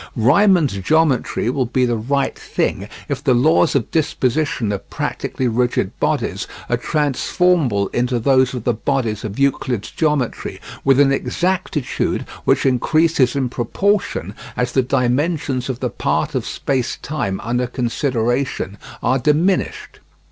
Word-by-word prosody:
Riemann's 150 - +4
geometry 135 - +1
will 130 -2 -1
be 125 +1 +1
the 120 -1 0
right 135 +5 -1
thing 100 +2 -2 0.2
if 140 -2 -3
the 130 -4 +3
laws 155 +5 +3
of 130 -6 0
disposition 145 -6 0
of 100 - -5
practically 130 - -2
rigid 120 +1 0
bodies - - -1 0.2
are - - +3
transformable 145 - +1
into 125 +1 +1
those 130 +1 +3
of 120 - -5
the 120 - +1
bodies 115 -3 -1
of 105 -1 -5
Euclid's 130 -5 0
geometry 150 -6 -1 0.2
with 135 0 +4
an 140 -1 +5
exactitude 175 0 -1 0.2
which - - +2
increases 140 +1 +2
in 135 -2 +1
proportion 190 - -1 0.2
as 125 0 0
the 130 - +3
dimensions 130 +2 0
of 130 -1 -4
the 125 - 0
part - - -1
of - - -2
space 130 -3 -2
time 100 -11 -2
under 120 +1 -1
consideration 120 -3 -1 0.2
are 130 +1 +2
diminished. 155 +8 0
130 Hz, 135 wpm, -19 LUFS, 120-150 Hz, 0.2 s, an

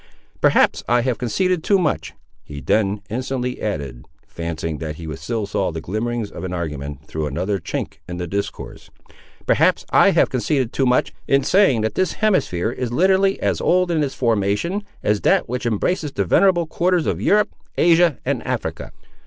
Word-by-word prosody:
"Perhaps - - +3
I 120 0 +4
have 120 -3 -1
conceded 180 - 0
too 200 - +3
much," 165 -6 -1 0.3
he 70 -1 -8
then 100 - 0
instantly 125 +1 -3
added, 70 - -4 0.2
fancying 80 -2 -4
that 80 -2 -5
he 80 -1 -6
still 115 - -3
saw 100 -2 -1
the 80 - -5
glimmerings 110 +5 -3
of - - -8
an 90 -1 -4
argument 75 -4 -5
through 80 -1 -3
another 90 +8 -2
chink 80 -1 -5
in 90 - -5
the 90 - -3
discourse. 100 +4 -5 0.6
"Perhaps - - +3
I - - +6
have - - +3
conceded 130 -6 0
too 135 - +1
much, 125 0 +2
in 135 0 +3
saying 185 - +4
that 110 0 -1
this 185 -1 0
hemisphere 115 - +1
is 125 -1 -4
literally 190 +6 +3
as - - 0
old 180 0 +2
in 160 -2 +1
its 140 -2 -2
formation, 115 - 0 0.2
as 105 -1 +1
that - - +3
which 125 0 -3
embraces 145 - -1
the 100 - -1
venerable 175 - +3
quarters 175 +1 +1
of - - -1
Europe, 210 +1 +2 0.2
Asia, 170 -3 +4
and - - -1
Africa." - - -4
115 Hz, 175 wpm, -21 LUFS, -, 0.6 s, I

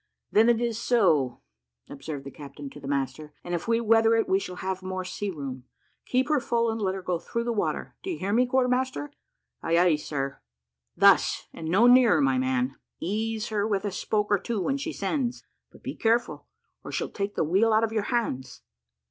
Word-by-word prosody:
"Then 220 +3 +5
it 235 -1 +3
is 235 -2 -1
so," 160 - +2 0.5
observed 145 0 -7
the 140 - -7
captain 140 -1 -9
to - - -11
the 140 - -9
master, 140 +2 -3
"and 175 - -5
if 175 - -3
we 230 0 +2
weather 225 0 +4
it 225 - +1
we 190 - +3
shall 180 -2 -6
have 190 +1 -4
more 185 0 -4
sea 200 +2 -4
room. 135 -7 -6 0.4
Keep 255 +3 +1
her 300 -2 +3
full, 235 -2 0
and 225 0 -4
let 190 -1 0
her 190 - -6
go 180 -2 -1
through 235 +6 -3
the 235 0 -1
water; 210 - -2
do - - -6
you 345 - -2
hear, 200 +2 -2
quarter 255 0 +2
master?" 260 +3 -1 0.5
"Ay, 165 0 +1
ay, 175 -2 +5
sir." 140 -2 -4 0.6
"Thus, - - +4
and 160 - -7
no 195 +8 +4
nearer, 245 -8 +6
my 135 -2 +2
man. 130 0 0 0.2
Ease 220 +3 -2
her 210 -1 0
with 200 -2 -1
a 205 - -1
spoke 210 +2 -1
or 205 - +4
two 230 +1 -3
when 270 +9 0
she 310 +4 -4
sends; 260 -6 -2 0.3
but - - -18
be - - -4
careful, 230 +1 0 0.4
or - - -7
she'll - - -2
take 200 0 -4
the - - +1
wheel 195 +8 +3
out 220 +1 +4
of 225 -1 -1
your 215 -2 0
hands." 130 - -2
200 Hz, 210 wpm, -27 LUFS, 155-230 Hz, 0.6 s, nearer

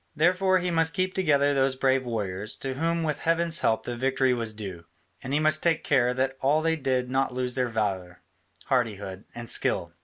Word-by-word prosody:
Therefore 185 +3 +3
he 180 -1 -1
must 165 -1 +1
keep 185 0 0
together 145 -6 +2
those 135 -1 +2
brave 130 -1 +1
warriors, 105 -2 -4
to 135 -1 -4
whom 165 +4 -1
with 150 -2 -2
heaven's 165 0 +1
help 110 - +1
the 120 - -4
victory 130 +1 +1
was 115 -2 -2
due, 95 -6 -8 0.4
and 130 - -6
he 145 - +2
must 155 0 +2
take 165 -2 +2
all - - -12
care 125 -4 +3
that 135 +1 -1 0.3
they 165 0 +2
did 130 -4 -1
not 135 -1 0
lose 125 -1 -1
their 125 -1 0
valour, 95 -6 -3 0.4
hardihood, 105 -6 -2
and 120 0 -7
skill. 85 -6 0
130 Hz, 195 wpm, -26 LUFS, 115-160 Hz, 0.4 s, Therefore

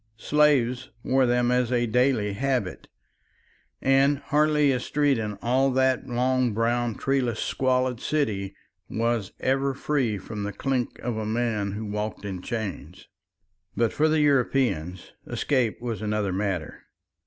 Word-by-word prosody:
Slaves 130 -2 +2
wore 130 -1 +3
them 120 0 +2
as 125 -1 +1
a 120 -1 +2
daily 120 -3 +1
habit, 125 -3 -2 1.0
and 135 +2 +4
hardly 150 0 +2
a 125 - 0
street 140 0 +1
in 105 -2 -4
all 130 +3 +3
that 130 0 +1
long 125 -1 +1
brown 120 0 0
treeless 130 -5 0
squalid 130 -2 0
city 110 -11 -1 0.3
was 115 -3 -1
ever 135 +1 +1
free 130 -7 0
from 105 +2 -7
the 100 0 -3
clink 130 +3 -2
of 120 -2 -2
a 110 - -3
man 110 -3 -1
who 110 +2 -5
walked 105 0 -4
in 95 -3 -5
chains. 95 - -6 0.7
But 115 -2 +1
for 155 +1 +2
the 155 0 +2
European 125 - +1 0.3
escape 125 -6 0
was 115 -4 -4
another 105 -2 -1
matter. 95 -5 -3
120 Hz, 140 wpm, -25 LUFS, 105-135 Hz, 1.0 s, and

